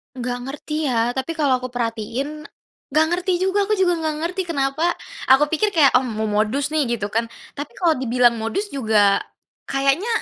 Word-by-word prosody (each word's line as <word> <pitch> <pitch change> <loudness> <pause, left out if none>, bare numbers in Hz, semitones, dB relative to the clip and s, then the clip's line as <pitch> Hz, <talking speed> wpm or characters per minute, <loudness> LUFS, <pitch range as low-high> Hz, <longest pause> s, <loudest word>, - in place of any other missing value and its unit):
Nggak 245 -1 -3
ngerti 300 +2 -3
ya, 235 -2 +1
tapi 265 +6 -3
kalau 280 -5 +2
aku 255 - -5
perhatiin 245 +5 -4 0.4
nggak 310 +3 +3
ngerti 360 +1 0
juga, 385 +3 +1
aku 425 - +2
juga 355 -3 +2
nggak 315 -1 -1
ngerti 365 +2 -2
kenapa 310 +2 0 0.3
aku 290 +3 +5
pikir 405 +6 0
kayak, 300 -4 +6
oh 260 - -4
mau 220 -2 -3
modus 215 +7 0
nih 305 -4 +1
gitu 205 -3 -5
kan, 230 +1 0 0.2
tapi 290 0 -8
kalau 330 -7 +1
dibilang 240 -2 +2
modus 390 - -3
juga, 215 -6 +3 0.5
kayaknya 275 +9 +1
275 Hz, 175 wpm, -21 LUFS, 240-330 Hz, 0.5 s, kayak